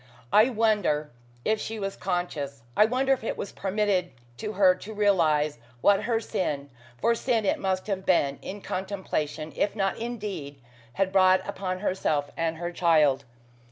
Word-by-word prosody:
I 215 +4 +7
wonder 210 - +1 0.3
if 215 0 +1
she 225 - -4
was 195 -1 -3
conscious. 155 -9 -3
I 210 - +6
wonder 260 +4 +2
if 255 - -3
it - - -3
was 200 - -5
permitted 195 -2 0 0.3
to 215 -1 -4
her 190 -2 +5
to 210 +4 -9
realize 155 - +2 0.2
what 200 -1 +4
her 230 -2 +1
sin 145 -10 -3 0.3
for 235 - +2
sin 230 -2 0
it - - +1
must 190 -1 -1
have 195 -2 -2
been, 140 -7 +2
in 205 +1 -7
contemplation, 185 -6 -3
if 205 - 0
not 195 -2 0
in 240 +1 -3
deed 165 -10 -6 0.3
had 195 -1 0
brought 185 -1 +4
upon 185 -2 -3
herself 150 -8 0
and 165 -1 -1
her 175 +1 -4
child. 155 -6 +3
190 Hz, 165 wpm, -27 LUFS, 160-210 Hz, 0.3 s, I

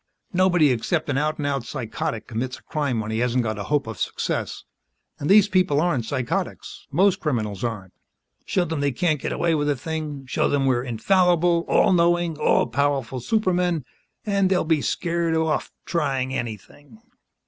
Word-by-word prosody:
Nobody 175 -5 +4
except 145 +7 -1
an 135 -1 +1
out 155 +1 -1
and 145 - -3
out 140 -3 -1
psychotic 115 -3 -4
commits 125 +3 -4
a - - -20
crime 140 -7 -1
when 110 0 -5
he 110 - -1
hasn't 125 +1 +1
got 110 -2 -3
a 100 - -4
hope 145 -1 +1
of 110 -4 -7
success. - - -3 0.6
And 145 - -3
these 205 0 +7
people 185 -7 +2
aren't 150 -8 +1
psychotics; 125 0 -4
most 190 +5 +3
criminals 110 - -2
aren't. 105 -6 -4 0.5
Show 180 - 0
them 160 -2 -3
they 140 -1 0
can't 155 +1 0
get - - -3
away 170 - +1
with 145 -1 +1
a 145 - +2
thing 150 0 -5
show 125 - 0
them 140 -1 +1
we're 125 -2 +2
infallible, 170 - +2
all - - +4
knowing, 175 -1 +2
all - - +3
powerful 140 -3 -1
supermen 180 - 0 0.4
and 200 -2 +2
they'll 185 -1 +2
be 155 -2 +2
scared 170 0 -1
off 160 -1 0
trying 135 -6 -1
anything." 120 - -7
145 Hz, 175 wpm, -23 LUFS, 125-170 Hz, 0.6 s, these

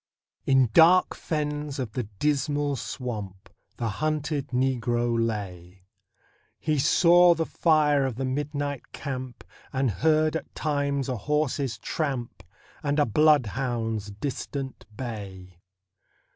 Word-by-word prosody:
In 135 -4 +4
dark 175 +3 +6
fens 150 -2 -3
of 125 -5 -3
the 125 -1 -3
Dismal 145 0 0
Swamp 105 -8 -6 0.3
The 115 - -2
hunted 150 +4 -2
Negro 120 -2 0
lay; 95 -5 -3 0.7
He 155 -2 0
saw 175 +4 +6
the 165 0 -1
fire 150 -5 +3
of 125 - -4
the 135 +2 -3
midnight 145 0 -3
camp, 130 -3 -6 0.3
And 135 -3 +1
heard 155 - +2
at 160 - -5
times 140 -3 -1
a 130 -2 -2
horse's 140 +1 -1
tramp 135 -7 -3 0.4
And 145 0 -1
a 145 - +4
bloodhound's 120 -5 +1
distant 135 +4 -5
bay. 95 -8 -7
135 Hz, 115 wpm, -26 LUFS, 115-150 Hz, 0.7 s, dark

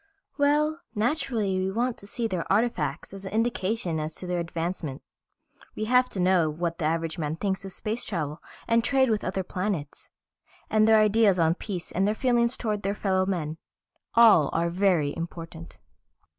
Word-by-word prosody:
"Well, 300 +2 +2 0.2
naturally 220 -5 0
we 190 +1 0
want 240 +4 -1
to 200 - -12
see 230 +2 -2
their 185 -5 -3
artifacts 190 - 0
as 195 0 -8
an 190 - -6
indication 220 -6 0
as 155 +1 -4
to - - -6
their 180 -1 -1
advancement. 165 -4 -4 0.7
We 215 - -2
have 250 +2 +3
to 195 - -4
know 180 -3 +3
what 170 +2 -3
the 160 - -1
average 165 +1 -1
man 155 0 -2
thinks 190 +2 -2
of 195 - -6
space 215 +5 -3
travel 155 -5 -3 0.3
and 230 0 +3
trade 265 -1 +3
with 215 - 0
other 190 +1 -2
planets. 180 -5 -4 0.6
And 215 0 +4
their 220 0 +6
ideas 215 -2 +4
on 165 -1 +3
peace 180 -1 -5
and 190 +3 +1
their 210 - +1
feelings 240 0 +2
towards 210 -3 -2
their 200 +1 -1
fellow 190 -2 0
men. 160 -4 -2 0.6
All 220 -11 +7
are 170 +1 0
very 175 -6 +2
important. 165 - -8
190 Hz, 175 wpm, -26 LUFS, 165-225 Hz, 0.7 s, All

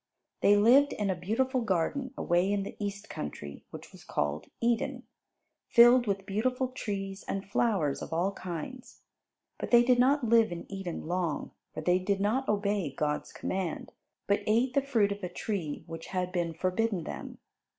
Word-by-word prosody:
They 205 - +6
lived 260 +7 +5
in 205 -2 -1
a - - -1
beautiful 245 +9 0
Garden 230 - -1
away 175 +3 +2
in 200 -1 0
the - - -7
East 200 0 -4
Country 75 -1 -7
which - - -10
was - - -14
called 75 +1 -2
Eden, 240 +2 0 0.6
filled 240 0 +7
with 195 -1 -1
beautiful 250 +6 0
trees 200 -5 -5
and 195 0 -3
flowers 195 -9 +1
of - - -7
all 175 +4 +1
kinds. 185 +7 -7 0.6
But - - -4
they 240 0 +7
did 250 0 +3
not 270 +3 +4
live 230 -3 +4
in 170 -1 -6
Eden 195 -4 -5
long 175 -3 -2 0.2
for - - -3
they 180 +3 +3
did 195 +1 0
not 225 +7 0
obey 200 -6 0
God's 150 +2 -2
command, 185 -3 -3 0.3
but 200 - +2
ate 235 +4 +2
the 280 - +3
fruit 230 -7 +2
of 200 0 -4
a 180 - -2
tree 175 -5 -4
which 165 -1 -8
had 180 -1 -2
been 170 -3 -1
forbidden 185 +2 0
them. - - -7
200 Hz, 170 wpm, -30 LUFS, 180-235 Hz, 0.6 s, filled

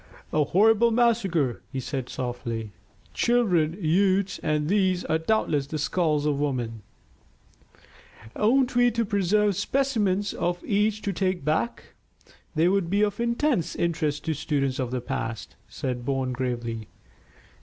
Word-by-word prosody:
"A 155 - +3
horrible 225 +7 +4
massacre," 215 - +1
he 135 - -3
said 130 -1 -4
softly. 115 -3 -4 0.4
"Children, 180 -9 +2
youths, 190 +3 +2
and 150 -1 0
these 190 -1 +1
are 160 - +1
doubtless 160 -6 0
the 155 - -4
skulls 150 -1 0
of 145 -2 +1
women." 120 -6 -2 1.5
"Oughtn't 250 +3 +2
we 245 0 +5
to 230 0 -1
preserve 205 0 +2
specimens 205 -7 0
of 175 +1 -2
each 210 +1 +1
to 200 - -1
take 185 -3 -1
back? 155 +10 -1 0.6
They 160 +2 +3
would 190 -2 +1
be 200 +3 +2
of 205 0 -1
intense 235 - 0
interest 155 -3 -1
to 160 - 0
students 140 -3 -1
of 130 -2 -1
the 125 0 -3
past," 115 -2 -5
said 125 -2 -4
Bourne 130 -1 -1
gravely. 120 -3 -3
170 Hz, 135 wpm, -26 LUFS, 140-210 Hz, 1.5 s, we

